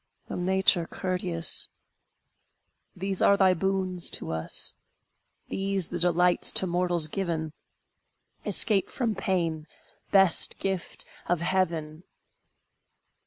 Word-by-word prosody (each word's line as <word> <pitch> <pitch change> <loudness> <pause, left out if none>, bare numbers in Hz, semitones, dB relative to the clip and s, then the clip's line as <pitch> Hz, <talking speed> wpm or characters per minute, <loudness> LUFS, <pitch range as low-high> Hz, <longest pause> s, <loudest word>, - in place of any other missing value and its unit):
O - - -3
Nature 180 -1 +2
courteous! 180 -3 -2 1.3
These 195 +1 -2
are 200 - +5
thy 190 -2 +4
boons 185 -1 -1
to 80 - 0
us, 80 0 -2 0.8
These 195 -2 -1
the 175 - -4
delights 175 +1 +3
to - - +4
mortals 175 -2 +1
given! 160 -3 -3 0.9
Escape 200 -4 +3
from 235 -4 -2
pain, 170 -5 -2 0.4
best 195 -4 +4
gift 190 -3 -3 0.2
of 175 -2 0
heaven! 165 -4 -1
180 Hz, 100 wpm, -27 LUFS, 170-190 Hz, 1.3 s, are